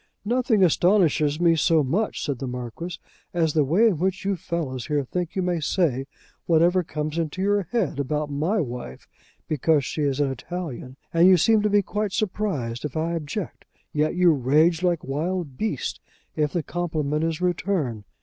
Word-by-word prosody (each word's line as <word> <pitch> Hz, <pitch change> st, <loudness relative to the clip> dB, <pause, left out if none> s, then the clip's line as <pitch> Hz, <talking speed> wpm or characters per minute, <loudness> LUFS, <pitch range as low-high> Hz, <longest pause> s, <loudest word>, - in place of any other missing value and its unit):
"Nothing 235 Hz, -3 st, +2 dB
astonishes 170 Hz, -4 st, +3 dB
me 170 Hz, -1 st, +4 dB
so 160 Hz, 0 st, +3 dB
much," 185 Hz, +12 st, -1 dB
said 140 Hz, -5 st, -2 dB
the 135 Hz, -, -4 dB
Marquis, 125 Hz, +8 st, -6 dB, 0.4 s
"as 160 Hz, -3 st, +2 dB
the 155 Hz, -, +3 dB
way 170 Hz, -, +3 dB
in 195 Hz, -9 st, +2 dB
which 190 Hz, +2 st, -1 dB
you 200 Hz, 0 st, +1 dB
fellows 150 Hz, -8 st, -4 dB
here 150 Hz, -2 st, 0 dB
think 175 Hz, +5 st, -4 dB
you 190 Hz, -, 0 dB
may 175 Hz, -2 st, 0 dB
say 140 Hz, -4 st, 0 dB, 0.4 s
whatever 175 Hz, +2 st, +4 dB
comes 155 Hz, 0 st, -3 dB
into 165 Hz, +2 st, -3 dB
your 205 Hz, +1 st, +2 dB
head 210 Hz, -, 0 dB
about 150 Hz, +2 st, -2 dB
my 160 Hz, +10 st, 0 dB
wife, 120 Hz, -, -5 dB, 0.4 s
because 155 Hz, -1 st, +2 dB
she 155 Hz, -, -3 dB
is 140 Hz, -1 st, 0 dB
an 140 Hz, -2 st, +1 dB
Italian, 135 Hz, -4 st, -6 dB, 0.2 s
and 170 Hz, +2 st, +6 dB
you 185 Hz, -1 st, +7 dB
seem 220 Hz, +5 st, +4 dB
to 210 Hz, -, +1 dB
be 205 Hz, 0 st, +3 dB
quite 210 Hz, 0 st, -2 dB
surprised 175 Hz, -, -2 dB
if 150 Hz, 0 st, -4 dB
I 160 Hz, +2 st, 0 dB
object; 165 Hz, +4 st, -5 dB, 0.3 s
yet 155 Hz, +2 st, +1 dB
you 180 Hz, -1 st, +5 dB
rage 155 Hz, +5 st, +3 dB
like 175 Hz, -3 st, +1 dB
wild 155 Hz, +1 st, -3 dB
beasts 220 Hz, +10 st, -3 dB, 0.4 s
if 150 Hz, -2 st, 0 dB
the 170 Hz, -, -1 dB
compliment 155 Hz, -3 st, -2 dB
is 165 Hz, -1 st, -1 dB
returned. 175 Hz, -, -1 dB
165 Hz, 180 wpm, -24 LUFS, 145-180 Hz, 0.4 s, you